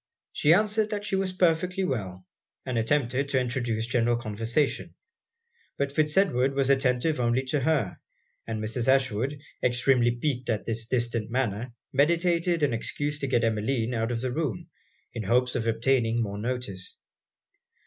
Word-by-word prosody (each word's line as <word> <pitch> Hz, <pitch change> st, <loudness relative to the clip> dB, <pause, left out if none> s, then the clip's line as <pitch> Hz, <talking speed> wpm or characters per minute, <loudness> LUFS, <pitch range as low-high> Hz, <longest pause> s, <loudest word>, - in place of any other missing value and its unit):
She 150 Hz, -, +3 dB
answered 210 Hz, +3 st, +3 dB
that 205 Hz, -1 st, -3 dB
she 195 Hz, -, -1 dB
was 190 Hz, -1 st, 0 dB
perfectly 180 Hz, +1 st, +1 dB
well; 95 Hz, -, -3 dB, 0.4 s
and 130 Hz, -, -3 dB
attempted 130 Hz, +3 st, +1 dB
to 130 Hz, -, +2 dB
introduce 120 Hz, -3 st, -1 dB
general 120 Hz, 0 st, +1 dB
conversation. 115 Hz, +5 st, -1 dB, 0.8 s
But 140 Hz, 0 st, -1 dB
Fitz 150 Hz, +2 st, +1 dB
Edward 135 Hz, -8 st, +3 dB
was 135 Hz, 0 st, +2 dB
attentive 130 Hz, +2 st, +1 dB
only 120 Hz, +2 st, +1 dB
to 135 Hz, +3 st, -1 dB
her; 135 Hz, -, 0 dB, 0.5 s
and 110 Hz, -1 st, -3 dB
Mrs. 115 Hz, +3 st, -2 dB
Ashwood, 135 Hz, +1 st, +1 dB, 0.2 s
extremely 125 Hz, 0 st, +3 dB
piqued 125 Hz, +1 st, -2 dB
at 110 Hz, -2 st, -1 dB
his 115 Hz, 0 st, -3 dB
distant 120 Hz, -3 st, -1 dB
manner, 120 Hz, -1 st, -2 dB, 0.2 s
meditated 170 Hz, +3 st, +2 dB
an 140 Hz, -4 st, +2 dB
excuse 145 Hz, +5 st, -2 dB
to 140 Hz, -, -2 dB
get 120 Hz, -3 st, +2 dB
Emmeline 115 Hz, +2 st, 0 dB
out 115 Hz, 0 st, -1 dB
of 115 Hz, -1 st, -2 dB
the 130 Hz, -1 st, -2 dB
room, 140 Hz, -, -3 dB, 0.4 s
in 115 Hz, -, -4 dB
hopes 125 Hz, +4 st, +2 dB
of 115 Hz, -2 st, -1 dB
obtaining 115 Hz, 0 st, +2 dB
more 100 Hz, -1 st, -4 dB
notice. 115 Hz, -5 st, -4 dB
125 Hz, 155 wpm, -27 LUFS, 115-145 Hz, 0.8 s, She